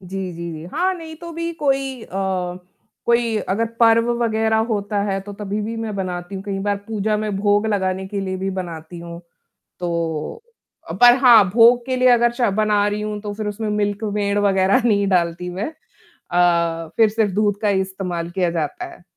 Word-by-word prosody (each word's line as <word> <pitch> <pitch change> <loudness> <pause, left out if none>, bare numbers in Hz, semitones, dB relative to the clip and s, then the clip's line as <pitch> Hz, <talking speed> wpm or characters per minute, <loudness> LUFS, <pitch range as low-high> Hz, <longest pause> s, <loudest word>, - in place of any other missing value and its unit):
जी, 190 0 -5
जी, 170 0 -6
जी। 155 0 -8
हाँ, 365 +3 +1
नहीं 325 -3 -9
तो 340 +1 -9
भी 335 +1 -3
कोई 270 -5 -1
अ, - - -12 1.0
कोई 235 -1 +2
अगर 220 +5 +1
पर्व 230 0 +5
वगैरह 220 -1 +1
होता 205 -2 -1
है 195 -1 -1
तो 205 +1 -9
तभी 205 +1 -4
भी 225 +2 -4
मैं 225 -2 -4
बनाती 180 0 -4
हूँ 190 - -5
कई 200 -2 -3
बार 205 0 0
पूजा 215 -1 0
में 215 0 -2
भोग 205 +1 +2
लगाने 190 -2 -1
के 200 0 -3
लिए 190 -1 -3
भी 190 +1 -3
बनाती 170 -1 -8
हूँ। 170 0 -8 0.6
तो 170 - -3 0.6
पर 245 0 +9
हाँ 230 -5 +8
भोग 235 +3 +5
के 260 -1 -1
लिए 255 0 +4
अगर 240 -1 +4
च 240 - -10 0.2
बना 210 -1 +2
रही 205 0 -2
हूँ 210 0 -4
तो 205 0 -5
फिर 215 0 -5
उसमें 215 +1 -4
मिल्क 205 0 -1
मेड़ 205 -1 0
वगैरह 195 +3 +3
नहीं 200 -4 +2
डालती 180 -1 0
मैं 190 +7 -3 0.6
अ, 170 -2 +2
फिर 225 -1 +5
सिर्फ 215 -2 0
दूध 205 0 +1
का 210 - +2
ही 195 -1 +2
इस्तेमाल 180 -3 -4
किया 180 -1 0
जाता 160 -4 -3
है। - - -20
205 Hz, 195 wpm, -21 LUFS, 185-225 Hz, 1.0 s, पर